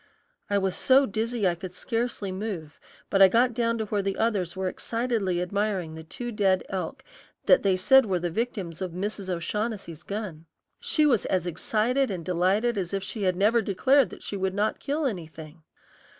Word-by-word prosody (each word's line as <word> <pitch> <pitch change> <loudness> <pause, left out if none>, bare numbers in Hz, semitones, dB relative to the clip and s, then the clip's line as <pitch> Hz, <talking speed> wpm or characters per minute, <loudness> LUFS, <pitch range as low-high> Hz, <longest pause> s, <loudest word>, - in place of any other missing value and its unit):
I 205 - +2
was 190 -2 0
so 270 +1 +5
dizzy 220 -1 -1
I 175 - +2
could 180 +1 -8
scarcely 225 -4 -2
move, 185 -6 -5 0.3
but 195 - +3
I 195 - +11
got 235 +5 +3
down 230 0 0
to 220 - -2
where 205 -1 -1
the 195 0 -2
others 195 -6 0
were 190 0 -1
excitedly 225 -3 -1
admiring 190 -2 -1
the 160 0 -8
two 240 +9 -6
dead 195 -4 +2
elk 190 +8 -4 0.4
that - - +6
they 195 -2 +2
said 265 +6 +5
were 185 -2 +1
the 175 0 -2
victims 195 -5 -3
of 185 -3 -3
Mrs. 200 +1 -4
O'Shaughnessy's 185 -1 -3
gun. 185 -5 -6 0.3
She 405 -11 +2
was 245 -8 +3
as 185 -2 0
excited 225 - 0
and 180 -5 -4
delighted 195 +6 +1
as 185 +1 -3
if 195 - -2
she 215 +2 -5
had 185 -2 +2
never 215 +5 +3
declared 260 +7 +2
she 200 - -4
would 190 0 -1
not 210 +2 0
kill 295 +2 -2
anything. 160 - -6
200 Hz, 185 wpm, -26 LUFS, 180-230 Hz, 0.4 s, I